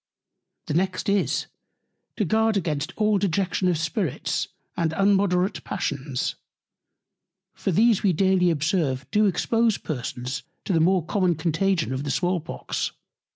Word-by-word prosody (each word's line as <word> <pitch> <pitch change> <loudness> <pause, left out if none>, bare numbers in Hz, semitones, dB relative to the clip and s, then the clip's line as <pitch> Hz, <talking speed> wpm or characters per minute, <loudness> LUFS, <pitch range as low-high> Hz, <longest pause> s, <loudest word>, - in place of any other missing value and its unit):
The - - -3
next 185 +4 0
is, 200 -1 +1 0.7
to 210 - 0
guard 220 +3 +2
against 150 -5 -2
all 210 -2 +2
Dejection 190 0 0
of 175 -3 +2
Spirits, 165 - -1 0.3
and 160 -2 0
immoderate 195 0 +2
Passions; 135 -2 -3 1.2
for - - -2
these 220 +4 +4
we 200 - +3
daily 185 +1 +3
observe 150 -4 0
do 210 -1 +4
expose 225 +3 +2
Persons 125 -2 -4 0.2
to 195 - 0
the 165 - +3
more 180 +1 +3
common 185 -2 +1
Contagion 165 0 0
of 130 +1 -3
the 145 - -4
Small 180 +4 +1
Pox. 160 - -4
180 Hz, 135 wpm, -25 LUFS, 155-200 Hz, 1.2 s, these